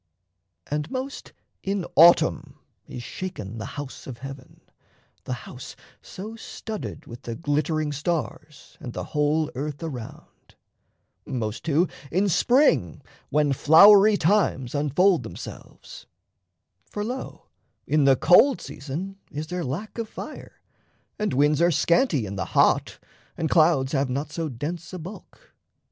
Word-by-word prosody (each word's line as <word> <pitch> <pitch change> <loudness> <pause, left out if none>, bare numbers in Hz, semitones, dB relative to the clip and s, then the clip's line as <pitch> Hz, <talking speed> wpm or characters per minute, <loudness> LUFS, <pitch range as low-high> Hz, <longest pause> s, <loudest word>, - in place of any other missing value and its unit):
And 150 +1 -3
most 265 +1 -5 0.3
in 195 -2 -2
autumn 170 +3 +5 0.3
is 120 - -7
shaken 115 - -6
the 110 - -5
house 145 -2 -7
of 125 -3 -7
heaven, 135 0 -10 0.6
The - - -3
house - - -10 0.3
so 215 +4 -8
studded 220 -1 -7
with 120 +2 -10
the 115 -3 -6
glittering 155 +1 -1
stars, 150 0 -4
And 120 - -7
the - - -4
whole 150 +1 +1
earth 145 +4 -5
around 130 -8 -9 0.7
most 110 -1 -3
too 165 +2 +2 0.2
in 195 +4 +2
spring 175 - +2 0.3
When 150 -1 +2
flowery 200 +9 +7
times 160 - +1
unfold 150 +5 +3
themselves: 110 -7 -10 0.8
for, 205 - -4
lo, 250 +4 -6 0.4
In 150 -2 +2
the 135 -1 +6
cold 180 - +5
season 170 +8 -7
is 150 +2 -5
there 180 +2 -4
lack 175 - -5
of 225 -2 -4
fire, - - -9 0.6
And 210 - 0
winds 145 +3 +2
are 170 - +5
scanty 165 - +2
in 100 0 -6
the 95 - -2
hot, - - +3 0.4
and 160 - -2
clouds 155 -5 +4
Have 140 -2 0
not 140 +4 -3
so 165 0 -3
dense 160 +8 -6
a - - -4
bulk. 200 - -12
155 Hz, 135 wpm, -25 LUFS, 135-185 Hz, 0.8 s, flowery